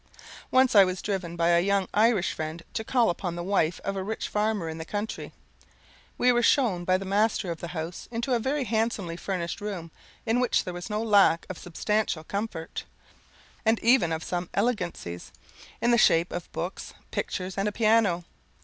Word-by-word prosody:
Once 260 Hz, 0 st, +4 dB
I 200 Hz, -2 st, +9 dB
was 185 Hz, -1 st, -1 dB
driven 185 Hz, -4 st, -3 dB
by 170 Hz, 0 st, +2 dB
a 170 Hz, 0 st, +5 dB
young 195 Hz, +1 st, +1 dB
Irish 215 Hz, -3 st, +3 dB
friend 160 Hz, +1 st, -5 dB
to 220 Hz, -, -2 dB
call 235 Hz, -3 st, +3 dB
upon 175 Hz, 0 st, -4 dB
the 175 Hz, -, -4 dB
wife 175 Hz, -3 st, +1 dB
of 195 Hz, -, -2 dB
a 190 Hz, -, -2 dB
rich 215 Hz, +4 st, -4 dB
farmer 210 Hz, -4 st, 0 dB
in 160 Hz, 0 st, -5 dB
the -, -, -4 dB
country. 205 Hz, +6 st, -4 dB, 0.9 s
We 250 Hz, -, +4 dB
were 240 Hz, 0 st, +3 dB
shewn 225 Hz, -9 st, +2 dB
by 185 Hz, +1 st, +3 dB
the 195 Hz, -, -6 dB
master 200 Hz, -1 st, +1 dB
of 165 Hz, -, -5 dB
the 170 Hz, -, -5 dB
house 165 Hz, 0 st, -6 dB
into 235 Hz, +2 st, -2 dB
a 240 Hz, -, +3 dB
very 270 Hz, +4 st, 0 dB
handsomely 220 Hz, -6 st, -1 dB
furnished 175 Hz, 0 st, -4 dB
room, 185 Hz, -6 st, -5 dB, 0.3 s
in 230 Hz, +1 st, +2 dB
which 250 Hz, -1 st, +2 dB
there 180 Hz, -, -5 dB
was 175 Hz, +3 st, -6 dB
no 210 Hz, +1 st, -1 dB
lack 200 Hz, -6 st, +4 dB
of 185 Hz, -, -8 dB
substantial 180 Hz, -1 st, -1 dB
comfort, 200 Hz, -3 st, -4 dB, 0.8 s
and 225 Hz, 0 st, +3 dB
even 235 Hz, -8 st, +4 dB
of 160 Hz, 0 st, -2 dB
some 175 Hz, 0 st, -3 dB
elegancies, 180 Hz, -, -2 dB, 0.5 s
in 240 Hz, -, +4 dB
the 235 Hz, -, +5 dB
shape 165 Hz, -2 st, +4 dB
of 175 Hz, -, -6 dB
books, 175 Hz, +3 st, -5 dB, 0.2 s
pictures, 185 Hz, 0 st, -3 dB
and 195 Hz, +1 st, 0 dB
a -, -, 0 dB
piano. 215 Hz, -5 st, +3 dB
195 Hz, 190 wpm, -27 LUFS, 175-220 Hz, 0.9 s, I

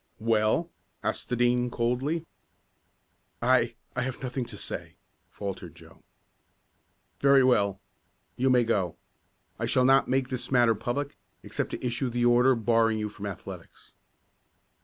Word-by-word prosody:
"Well?" 115 Hz, +9 st, +1 dB, 0.3 s
asked -, -, -2 dB
the 125 Hz, -, 0 dB
Dean, 120 Hz, 0 st, +2 dB
coldly. 125 Hz, +8 st, -1 dB, 1.1 s
"I -, -, +2 dB, 0.2 s
I 125 Hz, -, 0 dB
have 130 Hz, +1 st, -4 dB
nothing 125 Hz, 0 st, -3 dB
to -, -, -9 dB
say," -, -, -6 dB, 0.3 s
faltered 100 Hz, -2 st, -6 dB
Joe. -, -, -17 dB, 1.2 s
"Very 140 Hz, -1 st, +5 dB
well. 100 Hz, -6 st, +2 dB, 0.6 s
You 130 Hz, +2 st, +1 dB
may 125 Hz, -1 st, +5 dB
go. 100 Hz, -7 st, 0 dB, 0.6 s
I -, -, -1 dB
shall 130 Hz, -, +3 dB
not 135 Hz, +1 st, +5 dB
make 130 Hz, 0 st, 0 dB
this 130 Hz, -1 st, -4 dB
matter 120 Hz, -3 st, +4 dB
public, 125 Hz, +6 st, -3 dB, 0.3 s
except -, -, -3 dB
to -, -, -5 dB
issue 125 Hz, +2 st, -1 dB
the 120 Hz, 0 st, 0 dB
order 125 Hz, +2 st, +5 dB
barring 115 Hz, -1 st, +2 dB
you 105 Hz, 0 st, -2 dB
from 105 Hz, 0 st, -7 dB
athletics." 95 Hz, -2 st, -10 dB
120 Hz, 135 wpm, -28 LUFS, 110-130 Hz, 1.2 s, Very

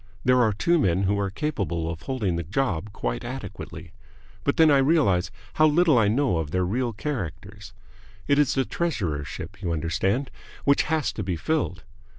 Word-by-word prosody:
There 125 Hz, 0 st, +5 dB
are 110 Hz, -3 st, +3 dB
two 170 Hz, -, +2 dB
men 95 Hz, -, +2 dB
who 100 Hz, +1 st, +1 dB
are 100 Hz, -1 st, 0 dB
capable 100 Hz, -, -2 dB
of 85 Hz, 0 st, -5 dB
holding 105 Hz, -5 st, -1 dB
the 85 Hz, -, -1 dB
job 100 Hz, -, -2 dB
quite -, -, -3 dB
adequately. -, -, -7 dB, 0.5 s
But 140 Hz, -, 0 dB
then 160 Hz, -2 st, +6 dB
I 140 Hz, -, +5 dB
realize 130 Hz, -, +3 dB, 0.2 s
how 155 Hz, -, +5 dB
little 160 Hz, 0 st, +4 dB
I 105 Hz, -, +3 dB
know 115 Hz, -, +2 dB
of 80 Hz, -3 st, -3 dB
their 90 Hz, +3 st, 0 dB
real 120 Hz, +6 st, -1 dB
characters. 105 Hz, -, -6 dB, 0.6 s
It 140 Hz, 0 st, +3 dB
is 150 Hz, -, +3 dB
the 135 Hz, -1 st, +1 dB
treasurership, 85 Hz, -, -3 dB
you 90 Hz, -4 st, -2 dB
understand, 95 Hz, -, -1 dB, 0.3 s
which 140 Hz, 0 st, +4 dB
has 160 Hz, -4 st, 0 dB
to -, -, -4 dB
be 90 Hz, -1 st, -2 dB
filled. 90 Hz, -, -1 dB
105 Hz, 175 wpm, -25 LUFS, 90-140 Hz, 0.6 s, then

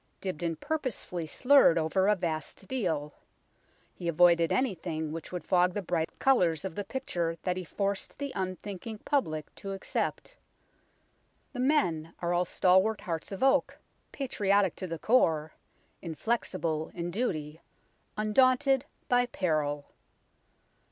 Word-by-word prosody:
Dibdin 170 Hz, -3 st, -3 dB
purposely 255 Hz, -, -3 dB
slurred 260 Hz, -, +5 dB
over 165 Hz, +4 st, +2 dB
a 210 Hz, -, +5 dB
vast 170 Hz, +1 st, -4 dB
deal. 160 Hz, -, -2 dB, 0.8 s
He 175 Hz, -, -6 dB
avoided 170 Hz, 0 st, +4 dB
anything 165 Hz, -, -1 dB
which 165 Hz, 0 st, -6 dB
would 180 Hz, -1 st, -4 dB
fog 180 Hz, 0 st, +3 dB
the 205 Hz, -, -2 dB
bright 165 Hz, -1 st, -1 dB
colours 180 Hz, -, +3 dB
of 190 Hz, -, -4 dB
the 205 Hz, -, -3 dB
picture 175 Hz, -10 st, -3 dB
that 180 Hz, -1 st, 0 dB
he 185 Hz, -, -4 dB
forced 200 Hz, +3 st, -2 dB
the 280 Hz, -1 st, -4 dB
unthinking 190 Hz, +3 st, -5 dB
public 155 Hz, -, -1 dB
to 195 Hz, -2 st, -6 dB
accept. 195 Hz, -, -3 dB, 1.2 s
The 250 Hz, -, -6 dB
men 175 Hz, -, +1 dB
are 175 Hz, 0 st, -1 dB
all 175 Hz, +1 st, +2 dB
stalwart 190 Hz, +5 st, +3 dB
hearts 165 Hz, -2 st, -4 dB
of 195 Hz, +5 st, -3 dB
oak, 270 Hz, +1 st, +3 dB, 0.3 s
patriotic 205 Hz, -, +1 dB
to 185 Hz, -, -4 dB
the 165 Hz, -1 st, -4 dB
core, 160 Hz, -8 st, +2 dB, 0.5 s
inflexible 165 Hz, -3 st, -2 dB
in 175 Hz, 0 st, -3 dB
duty, 160 Hz, -8 st, -2 dB, 0.6 s
undaunted 255 Hz, +5 st, +3 dB, 0.2 s
by 245 Hz, 0 st, +3 dB
peril. 150 Hz, -8 st, -1 dB
185 Hz, 130 wpm, -29 LUFS, 165-220 Hz, 1.2 s, slurred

